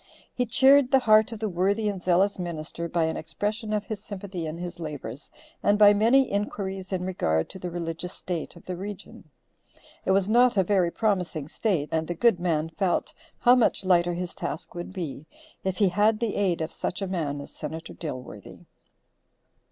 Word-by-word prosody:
He 250 Hz, -1 st, -1 dB
cheered 270 Hz, +3 st, +5 dB
the 270 Hz, -, +6 dB
heart 215 Hz, +1 st, +5 dB
of 225 Hz, -, -5 dB
the 220 Hz, -, -1 dB
worthy 200 Hz, +4 st, +1 dB
and 200 Hz, -3 st, -2 dB
zealous 185 Hz, +3 st, +2 dB
minister 170 Hz, -1 st, -5 dB
by 170 Hz, 0 st, +1 dB
an 160 Hz, 0 st, 0 dB
expression 210 Hz, +7 st, -3 dB
of 210 Hz, -1 st, -1 dB
his 215 Hz, -2 st, -6 dB
sympathy 190 Hz, -5 st, -6 dB
in 155 Hz, +2 st, -5 dB
his 175 Hz, 0 st, -6 dB
labors, 150 Hz, -3 st, -7 dB, 0.3 s
and 205 Hz, 0 st, +3 dB
by 205 Hz, -1 st, +8 dB
many 230 Hz, +6 st, +5 dB
inquiries 195 Hz, -2 st, -3 dB
in 180 Hz, -1 st, -1 dB
regard 80 Hz, -, 0 dB
to 190 Hz, -, -8 dB
the 180 Hz, -, -4 dB
religious 170 Hz, +1 st, -4 dB
state 175 Hz, -3 st, -5 dB
of 170 Hz, -, -15 dB
the 180 Hz, -, -4 dB
region. 200 Hz, +2 st, -8 dB, 0.7 s
It -, -, -4 dB
was 190 Hz, 0 st, +3 dB
not 240 Hz, +1 st, +4 dB
a 190 Hz, -, +5 dB
very 185 Hz, -2 st, +2 dB
promising 180 Hz, -8 st, -1 dB
state, 165 Hz, -4 st, -1 dB
and 160 Hz, 0 st, 0 dB
the 175 Hz, -, -3 dB
good 225 Hz, 0 st, +3 dB
man 165 Hz, -3 st, 0 dB
felt 180 Hz, +2 st, -1 dB, 0.2 s
how 245 Hz, -, +5 dB
much 235 Hz, -5 st, +2 dB
lighter 175 Hz, -1 st, +3 dB
his 180 Hz, 0 st, -4 dB
task 160 Hz, -, -5 dB
would 175 Hz, +1 st, -6 dB
be, 160 Hz, -5 st, -6 dB, 0.4 s
if 190 Hz, -1 st, -1 dB
he 200 Hz, -2 st, +4 dB
had 210 Hz, +4 st, +2 dB
the 230 Hz, -3 st, -1 dB
aid 185 Hz, -5 st, +1 dB
of 160 Hz, -, -3 dB
such 185 Hz, -, -3 dB
a -, -, -2 dB
man 155 Hz, -6 st, -2 dB
as 140 Hz, -, -9 dB
Senator 160 Hz, +2 st, -7 dB
Dilworthy. 125 Hz, -, -8 dB
185 Hz, 190 wpm, -26 LUFS, 170-205 Hz, 0.7 s, by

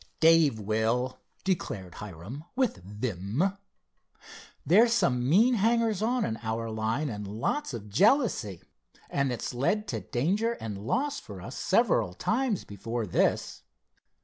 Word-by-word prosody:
"Dave 160 Hz, -7 st, +5 dB
will," 110 Hz, +5 st, 0 dB, 0.2 s
declared 105 Hz, -, -2 dB
Hiram 105 Hz, -, -8 dB
with 255 Hz, -, +1 dB
vim. 105 Hz, -, -2 dB, 1.1 s
"There's 225 Hz, -, +5 dB
some 125 Hz, -, +2 dB
mean 225 Hz, -, +5 dB
hangers 225 Hz, -1 st, +2 dB
on 240 Hz, +2 st, +1 dB
in 110 Hz, -, -3 dB
our 115 Hz, 0 st, -3 dB
line, 110 Hz, +7 st, -1 dB
and 105 Hz, -5 st, -5 dB
lots 115 Hz, -, -2 dB
of 115 Hz, -4 st, -7 dB
jealousy, 155 Hz, -, +2 dB, 0.5 s
and 140 Hz, -2 st, +1 dB
it's 120 Hz, -, -4 dB
led 205 Hz, -, 0 dB
to -, -, -2 dB
danger 195 Hz, -, 0 dB
and 105 Hz, -, -6 dB
loss 280 Hz, +3 st, 0 dB
for 100 Hz, -3 st, -10 dB
us 115 Hz, +9 st, -8 dB
several 120 Hz, -, +2 dB
times 230 Hz, -, 0 dB
before 115 Hz, +3 st, -4 dB
this. -, -, 0 dB
125 Hz, 130 wpm, -28 LUFS, -, 1.1 s, Dave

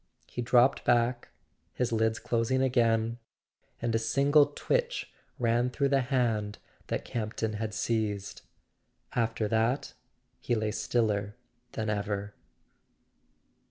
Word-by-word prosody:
He 125 Hz, -, -5 dB
dropped 125 Hz, +2 st, +4 dB
back, 120 Hz, 0 st, +2 dB, 0.5 s
his 125 Hz, -1 st, -1 dB
lids 110 Hz, 0 st, +1 dB
closing 120 Hz, +3 st, 0 dB
again, 115 Hz, -2 st, +2 dB, 0.6 s
and 120 Hz, -1 st, -1 dB
a 115 Hz, -, +2 dB
single 140 Hz, +6 st, +4 dB
twitch -, -, -2 dB, 0.2 s
ran 120 Hz, +1 st, +2 dB
through 140 Hz, +2 st, 0 dB
the 135 Hz, -1 st, +3 dB
hand 115 Hz, -5 st, 0 dB, 0.3 s
that -, -, -3 dB
Campton 110 Hz, -1 st, -3 dB
had 105 Hz, -1 st, -4 dB
seized. 105 Hz, 0 st, -2 dB, 0.7 s
After 115 Hz, -2 st, 0 dB
that 115 Hz, +5 st, 0 dB, 0.5 s
he 120 Hz, -, 0 dB
lay 110 Hz, -1 st, -1 dB
stiller 105 Hz, -3 st, 0 dB, 0.4 s
than 110 Hz, -1 st, -2 dB
ever. 100 Hz, 0 st, -3 dB
115 Hz, 115 wpm, -29 LUFS, 110-125 Hz, 0.7 s, dropped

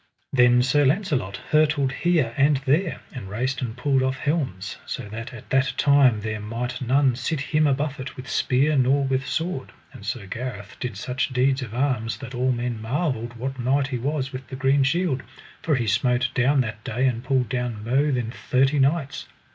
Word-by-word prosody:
Then 125 Hz, -1 st, +5 dB
Sir 145 Hz, +3 st, +3 dB
Launcelot 140 Hz, -, 0 dB
hurtled 155 Hz, -3 st, +3 dB
here 155 Hz, -6 st, +1 dB
and 140 Hz, 0 st, +4 dB
there, 160 Hz, +6 st, +1 dB
and 110 Hz, -7 st, -7 dB
raced 130 Hz, +7 st, -2 dB
and 120 Hz, -1 st, -4 dB
pulled 135 Hz, +1 st, +2 dB
off 130 Hz, 0 st, 0 dB
helms, 135 Hz, -, -2 dB
so -, -, -5 dB
that 115 Hz, +4 st, -6 dB
at 120 Hz, -4 st, -12 dB
that 135 Hz, 0 st, +2 dB
time 135 Hz, -6 st, +4 dB
there 110 Hz, 0 st, -3 dB
might 120 Hz, +4 st, -4 dB
none 130 Hz, +1 st, +3 dB
sit 140 Hz, +5 st, -2 dB
him 150 Hz, +2 st, +2 dB
a 140 Hz, -, +4 dB
buffet 140 Hz, -2 st, -4 dB
with 130 Hz, 0 st, -8 dB
spear 140 Hz, +4 st, +2 dB
nor 135 Hz, +1 st, +3 dB
with 135 Hz, 0 st, -1 dB
sword; 160 Hz, -4 st, -2 dB, 0.2 s
and -, -, -12 dB
Sir 105 Hz, 0 st, -4 dB
Gareth 105 Hz, -1 st, -6 dB
did 125 Hz, -5 st, -4 dB
such 125 Hz, +7 st, -2 dB
deeds 130 Hz, +1 st, +2 dB
of 120 Hz, -3 st, -6 dB
arms 125 Hz, -4 st, 0 dB
that 130 Hz, -2 st, -9 dB
all 125 Hz, +1 st, +1 dB
men 120 Hz, -2 st, -2 dB
marvelled 120 Hz, -1 st, -2 dB
what 130 Hz, +3 st, -5 dB
knight 135 Hz, +3 st, +1 dB
he 125 Hz, -3 st, -2 dB
was 135 Hz, +1 st, -2 dB
with 130 Hz, -1 st, -7 dB
the 130 Hz, -, -7 dB
green 135 Hz, +1 st, +2 dB
shield, 140 Hz, -1 st, +1 dB, 0.4 s
for 155 Hz, -, +1 dB
he 120 Hz, -3 st, 0 dB
smote 120 Hz, +4 st, +2 dB
down 135 Hz, +2 st, +3 dB
that 110 Hz, -2 st, -5 dB
day 125 Hz, +4 st, -1 dB
and 120 Hz, -2 st, 0 dB
pulled 130 Hz, -2 st, +1 dB
down 125 Hz, -4 st, -3 dB
mo 135 Hz, +6 st, +2 dB
than 120 Hz, -3 st, -1 dB
thirty 135 Hz, +3 st, +1 dB
knights. 140 Hz, +1 st, 0 dB
130 Hz, 195 wpm, -24 LUFS, 120-140 Hz, 0.4 s, Then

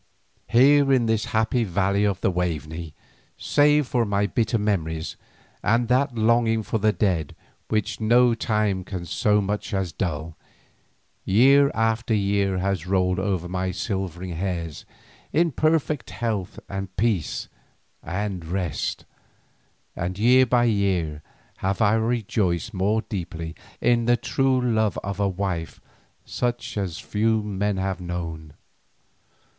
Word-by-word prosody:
Here 135 Hz, +3 st, +5 dB
in 130 Hz, -3 st, +3 dB
the 110 Hz, 0 st, +3 dB
happy 110 Hz, +2 st, +1 dB
valley 100 Hz, +1 st, +1 dB
of 100 Hz, -2 st, -1 dB
the -, -, +2 dB
Waveney, 80 Hz, -2 st, -3 dB, 0.4 s
save 150 Hz, 0 st, +3 dB
for 125 Hz, -1 st, +1 dB
my 100 Hz, -1 st, +1 dB
bitter 115 Hz, +1 st, 0 dB
memories 85 Hz, -7 st, -2 dB, 0.5 s
and 115 Hz, +2 st, +1 dB
that 130 Hz, +1 st, +2 dB
longing 115 Hz, 0 st, +2 dB
for 110 Hz, -, -2 dB
the 110 Hz, +1 st, +3 dB
dead 90 Hz, -8 st, -1 dB, 0.3 s
which 110 Hz, 0 st, -1 dB
no 120 Hz, +2 st, +5 dB
time 105 Hz, -4 st, 0 dB
can 90 Hz, -2 st, -6 dB
so 105 Hz, +4 st, +2 dB
much 100 Hz, +1 st, -3 dB
as 95 Hz, -3 st, -1 dB
dull, 80 Hz, -4 st, -3 dB, 0.9 s
year 135 Hz, +8 st, +5 dB
after 110 Hz, 0 st, +1 dB
year 100 Hz, -1 st, +1 dB
has 95 Hz, -2 st, -1 dB
rolled 90 Hz, -1 st, +1 dB
over 95 Hz, -3 st, -1 dB
my 90 Hz, +1 st, -2 dB
silvering 95 Hz, -2 st, -4 dB
hairs 85 Hz, -2 st, -4 dB, 0.5 s
in 165 Hz, +2 st, +2 dB
perfect 155 Hz, -1 st, 0 dB
health 105 Hz, -6 st, -3 dB
and 95 Hz, -1 st, -6 dB
peace 105 Hz, -6 st, 0 dB, 0.5 s
and 95 Hz, +1 st, -3 dB
rest, 90 Hz, -1 st, -3 dB, 0.9 s
and 90 Hz, +2 st, -3 dB
year 125 Hz, +4 st, +5 dB
by 120 Hz, 0 st, +3 dB
year 95 Hz, -9 st, 0 dB, 0.4 s
have 95 Hz, +1 st, -1 dB
I 105 Hz, -2 st, +4 dB
rejoiced 110 Hz, -3 st, 0 dB
more 105 Hz, +4 st, +1 dB
deeply 85 Hz, -5 st, -5 dB, 0.3 s
in 120 Hz, -1 st, +2 dB
the 120 Hz, 0 st, +4 dB
true 135 Hz, +3 st, +1 dB
love 110 Hz, -4 st, +1 dB
of 100 Hz, 0 st, -4 dB
a 100 Hz, -1 st, +2 dB
wife 95 Hz, -3 st, -3 dB, 0.5 s
such 120 Hz, -1 st, -3 dB
as 95 Hz, -5 st, -3 dB
few 110 Hz, +1 st, 0 dB, 0.2 s
have 95 Hz, -3 st, -1 dB
known. 85 Hz, -3 st, -6 dB
100 Hz, 130 wpm, -24 LUFS, 90-115 Hz, 0.9 s, Here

